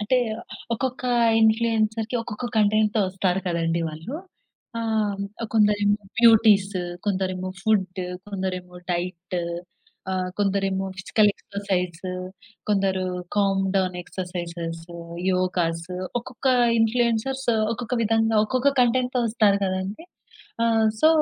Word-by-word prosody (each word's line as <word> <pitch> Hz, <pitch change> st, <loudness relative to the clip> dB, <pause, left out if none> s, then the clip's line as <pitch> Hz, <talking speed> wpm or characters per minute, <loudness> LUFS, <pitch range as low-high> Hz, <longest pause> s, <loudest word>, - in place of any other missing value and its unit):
అంటే 230 Hz, +5 st, +2 dB, 0.6 s
ఒక్కొక్క 255 Hz, +2 st, -3 dB, 0.4 s
ఇన్‌ఫ్లుయెన్సర్‌కి 220 Hz, +1 st, +2 dB
ఒక్కొక్క 230 Hz, +1 st, -6 dB
కంటెంట్‌తో 215 Hz, 0 st, +3 dB
వస్తారు 185 Hz, 0 st, 0 dB
కదండీ 170 Hz, -1 st, 0 dB
వాళ్ళు. 160 Hz, -, -7 dB, 0.6 s
ఆహ్, 215 Hz, -3 st, 0 dB, 0.3 s
కొందరేమో 205 Hz, -2 st, +3 dB, 0.2 s
బ్యూటీస్ 215 Hz, -4 st, +6 dB, 0.3 s
కొందరేమో 185 Hz, -2 st, -1 dB
ఫుడ్ 190 Hz, -3 st, +1 dB, 0.3 s
కొందరేమో 185 Hz, -2 st, -4 dB, 0.2 s
డైట్ 180 Hz, +1 st, -3 dB, 0.8 s
ఆహ్, 185 Hz, -1 st, -1 dB
కొందరేమో 195 Hz, -1 st, 0 dB
ఫిజికల్ 210 Hz, +2 st, +3 dB
ఎక్సర్‌సైజ్ 185 Hz, -4 st, -3 dB, 0.7 s
కొందరు 195 Hz, -2 st, +1 dB, 0.3 s
కామ్ 195 Hz, -1 st, +2 dB
డౌన్ 185 Hz, -1 st, 0 dB
ఎక్సర్‌సైజ్స్, 170 Hz, -2 st, -5 dB, 0.5 s
యోగాస్ 175 Hz, -2 st, 0 dB, 0.3 s
ఒక్కొక్క 255 Hz, +2 st, -8 dB, 0.3 s
ఇన్‌ఫ్లుయెన్సర్స్ 235 Hz, +3 st, +1 dB, 0.3 s
ఒక్కొక్క 240 Hz, +1 st, -4 dB
విధంగా 225 Hz, 0 st, +2 dB
ఒక్కొక్క 260 Hz, +4 st, +2 dB
కంటెంట్‌తో 250 Hz, +1 st, +1 dB
వస్తారు 215 Hz, -3 st, +3 dB
కదండీ! 190 Hz, -, -3 dB, 0.6 s
ఆహ్, 225 Hz, -1 st, +3 dB
సో, 310 Hz, -, +8 dB
200 Hz, 95 wpm, -24 LUFS, 185-225 Hz, 0.8 s, సో